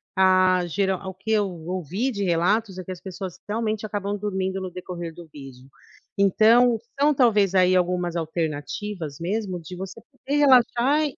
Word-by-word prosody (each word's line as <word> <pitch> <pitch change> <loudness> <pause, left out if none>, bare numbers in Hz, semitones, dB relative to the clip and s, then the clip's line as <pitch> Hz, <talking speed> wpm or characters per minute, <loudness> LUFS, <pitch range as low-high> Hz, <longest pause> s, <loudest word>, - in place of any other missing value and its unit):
ah, 185 -1 +4
gera 190 +2 0
o 190 - -5
que 190 +4 -6
eu 210 -2 +2
ouvi 180 - -3
de 200 -3 -3
relatos 190 +4 +1
é 185 - -5
que 185 - -8
as 180 - -8
pessoas 190 -1 -7
realmente 215 -1 -2
acabam 205 -1 -3
dormindo 190 -2 -2
no 185 - -4
decorrer 175 -2 -6
do 170 0 -12
vídeo. 135 -3 -12 0.5
Então, 225 +4 +5 0.2
são 295 +1 +4
talvez 210 -7 +3
aí 185 0 +4
algumas 180 -1 0
alternativas 160 +1 -4
mesmo 185 +1 -2
de 165 +3 -9
você 190 +1 -7
poder 275 +2 -3
relaxar 265 +1 +4
190 Hz, 160 wpm, -24 LUFS, 175-215 Hz, 0.5 s, Então